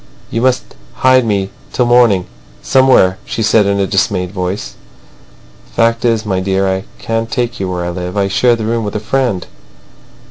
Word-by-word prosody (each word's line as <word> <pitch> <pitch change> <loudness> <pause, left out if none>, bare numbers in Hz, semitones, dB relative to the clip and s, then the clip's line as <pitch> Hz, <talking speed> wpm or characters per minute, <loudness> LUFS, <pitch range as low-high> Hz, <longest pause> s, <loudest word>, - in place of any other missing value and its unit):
"You 115 - -1
must 130 0 +2 0.3
hide 130 -1 +4
me 100 -2 -1 0.2
till 125 - +1
the - - -1
morning 120 -7 +4 0.4
somewhere," 130 -8 +4
she 115 - -3
said 105 -1 +3
in 100 0 +1
a 100 - +2
dismayed 95 -2 0
voice. 90 -9 -4 1.0
"Fact 115 0 +2
is, 115 -2 +1
my 95 -3 -1
dear, 95 +1 0
I 95 +1 -2
can't 115 0 -2
take 120 0 -2
you 95 -1 -2
where 90 -1 -3
I 90 - -2
live. 90 +2 -5
I 100 -1 +2
share 120 +5 +2
the 110 -2 -4
room 115 +1 -1
with 105 0 -4
a - - 0
friend." 120 -4 -1
105 Hz, 185 wpm, -15 LUFS, 95-115 Hz, 1.0 s, hide